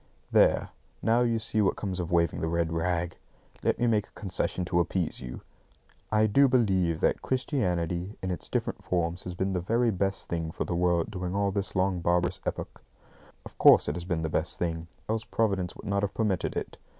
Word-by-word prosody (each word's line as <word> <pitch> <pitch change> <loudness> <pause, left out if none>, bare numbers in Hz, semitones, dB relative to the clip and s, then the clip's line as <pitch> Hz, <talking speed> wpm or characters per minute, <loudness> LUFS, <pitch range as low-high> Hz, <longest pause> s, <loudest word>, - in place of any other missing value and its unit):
There, - - +4 0.3
now, 115 +2 +3
you 115 -2 +2
see 110 -1 0
what 100 - +2
comes 95 -3 -3
of 85 -1 -3
waving 85 -1 +2
the 80 - 0
red 85 0 0
rag! 85 0 -1 0.4
Let - - +1
me 120 - +1
make 110 -4 +2
a - - -25
concession 90 -2 -2
to 85 0 +1
appease 85 -1 -1
you. 60 0 -7 0.7
I 110 0 +4
do 135 +7 +5
believe 95 -10 +2
that - - +2
Christianity 90 - -1
in 95 - -1
its 90 - -5
different - - -2
forms 85 0 -1
has 90 -1 -5
been 95 +1 -1
the 90 - 0
very 115 +5 +2
best 95 0 -1
thing 85 -1 -2
for - - -3
the - - -3
world 85 -1 +1
during 90 -2 -3
all 100 0 +1
this 95 -1 -3
long 95 -1 +1
barbarous 85 +1 +1
epoch. - - -4 0.6
Of - - -12
course, - - +7
it - - -1
has 90 - -4
been 85 -3 -1
the - - 0
best 80 +1 -1
thing, 85 -1 -2 0.2
else 110 +1 -1
Providence 95 -7 0
would - - -11
not 100 -1 0
have 100 -1 -2
permitted 105 -5 0
it. - - -5
90 Hz, 205 wpm, -28 LUFS, 85-105 Hz, 0.7 s, course